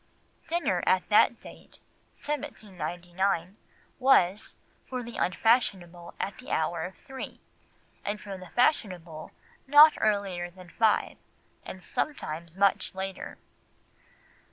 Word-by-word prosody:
Dinner 345 Hz, +1 st, 0 dB
at -, -, +3 dB
that -, -, +5 dB
date -, -, -14 dB, 0.4 s
(1799) 185 Hz, -, -3 dB, 0.4 s
was, 210 Hz, -7 st, +3 dB, 0.3 s
for 255 Hz, -1 st, -4 dB
the 235 Hz, 0 st, -8 dB
unfashionable, 180 Hz, -4 st, 0 dB
at 200 Hz, -, -4 dB
the 255 Hz, -, -11 dB
hour 160 Hz, +1 st, 0 dB
of 185 Hz, -, -9 dB
three, 265 Hz, -1 st, -9 dB, 0.6 s
and 205 Hz, +1 st, -3 dB
for 200 Hz, -2 st, -7 dB
the 185 Hz, -2 st, -11 dB
fashionable 180 Hz, -, 0 dB, 0.4 s
not 295 Hz, +2 st, +9 dB
earlier 195 Hz, -4 st, 0 dB
than 180 Hz, 0 st, -14 dB
five, 220 Hz, +4 st, +1 dB, 0.5 s
and 185 Hz, -, -9 dB
sometimes 170 Hz, -, -4 dB
much 195 Hz, -1 st, +2 dB
later. 190 Hz, 0 st, -6 dB
195 Hz, 105 wpm, -28 LUFS, 175-235 Hz, 0.6 s, not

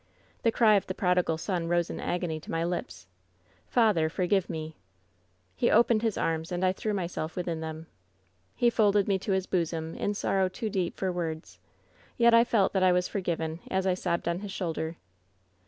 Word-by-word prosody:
"The 230 Hz, -, +3 dB
cry 220 Hz, -2 st, +5 dB
of 195 Hz, -, -2 dB
the 185 Hz, -, -4 dB
prodigal 180 Hz, -4 st, +1 dB
son 170 Hz, 0 st, -2 dB
rose 175 Hz, 0 st, +1 dB
in -, -, -6 dB
agony 175 Hz, -3 st, -2 dB
to -, -, -14 dB
my 165 Hz, 0 st, -1 dB
lips: 95 Hz, -, -4 dB, 0.3 s
" 90 Hz, 0 st, -36 dB
Tather! 210 Hz, -10 st, +4 dB
forgive 185 Hz, +2 st, 0 dB
me 155 Hz, -1 st, -4 dB
!^ -, -, -38 dB, 0.7 s
"He -, -, +2 dB
opened 230 Hz, -1 st, +4 dB
his 225 Hz, -3 st, 0 dB
arms, 160 Hz, +1 st, -1 dB
and 180 Hz, +1 st, 0 dB
I 185 Hz, -, +3 dB
threw 215 Hz, +2 st, -3 dB
myself 175 Hz, -4 st, -3 dB
within 170 Hz, -3 st, -3 dB
them. 160 Hz, 0 st, -6 dB, 0.7 s
"He 240 Hz, -1 st, +3 dB
folded 205 Hz, -3 st, +3 dB
me 195 Hz, -2 st, +1 dB
to 195 Hz, -, -3 dB
his 190 Hz, -1 st, 0 dB
bosom 165 Hz, -3 st, -2 dB
in 205 Hz, -, -2 dB
sorrow 190 Hz, -2 st, +1 dB
too 215 Hz, +3 st, -4 dB
deep 185 Hz, -3 st, -2 dB
for 190 Hz, -1 st, -1 dB
words, 160 Hz, -, -5 dB, 0.6 s
yet 235 Hz, 0 st, +5 dB
I 230 Hz, 0 st, +7 dB
felt 220 Hz, -5 st, +2 dB
that 190 Hz, -, +1 dB
I 185 Hz, -1 st, +5 dB
was 180 Hz, 0 st, +2 dB
forgiven 165 Hz, -4 st, -3 dB
as 190 Hz, 0 st, 0 dB
I 185 Hz, -, +3 dB
sobbed 170 Hz, -2 st, -2 dB
on 170 Hz, +1 st, 0 dB
his 205 Hz, 0 st, -6 dB
shoulder. 165 Hz, -3 st, -3 dB
180 Hz, 200 wpm, -28 LUFS, 165-200 Hz, 0.7 s, I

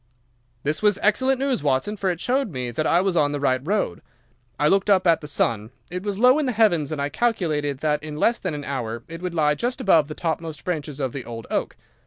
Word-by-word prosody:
"This 150 Hz, +2 st, -1 dB
was 210 Hz, -2 st, +3 dB
excellent 260 Hz, +6 st, +3 dB
news, 270 Hz, -2 st, 0 dB
Watson, 145 Hz, +9 st, 0 dB
for 195 Hz, -2 st, -1 dB
it 175 Hz, -2 st, -2 dB
showed 255 Hz, +3 st, 0 dB
me 125 Hz, -6 st, -4 dB
that 155 Hz, +6 st, -1 dB
I 175 Hz, -, +4 dB
was 190 Hz, -2 st, 0 dB
on 145 Hz, -3 st, +2 dB
the 145 Hz, -, -2 dB
right 130 Hz, -2 st, +1 dB
road. 190 Hz, -, -1 dB, 0.6 s
I 150 Hz, -, +3 dB
looked 195 Hz, +5 st, +2 dB
up 190 Hz, -2 st, +4 dB
at 165 Hz, -2 st, +4 dB
the 150 Hz, -, -7 dB
sun. 110 Hz, -6 st, 0 dB, 0.2 s
It 180 Hz, 0 st, -3 dB
was 200 Hz, -1 st, -3 dB
low 250 Hz, +6 st, +5 dB
in 295 Hz, -, 0 dB
the 250 Hz, -, 0 dB
heavens, 175 Hz, -10 st, +2 dB
and 155 Hz, -, -3 dB
I 140 Hz, 0 st, -1 dB
calculated 155 Hz, -, -1 dB
that 150 Hz, -1 st, +1 dB
in 150 Hz, -1 st, -7 dB
less 230 Hz, +9 st, +2 dB
than 180 Hz, -5 st, -3 dB
an 145 Hz, -, -5 dB
hour 120 Hz, -4 st, -4 dB
it 165 Hz, +1 st, -8 dB
would 180 Hz, -1 st, -4 dB
lie 150 Hz, -2 st, +3 dB
just 245 Hz, -, -2 dB
above 170 Hz, -, +4 dB
the 150 Hz, -, -7 dB
topmost 160 Hz, -3 st, -3 dB
branches 150 Hz, -5 st, -3 dB
of 130 Hz, -3 st, -2 dB
the 135 Hz, -, -5 dB
old 115 Hz, -1 st, -8 dB
oak. -, -, -1 dB
160 Hz, 245 wpm, -23 LUFS, 145-205 Hz, 0.6 s, low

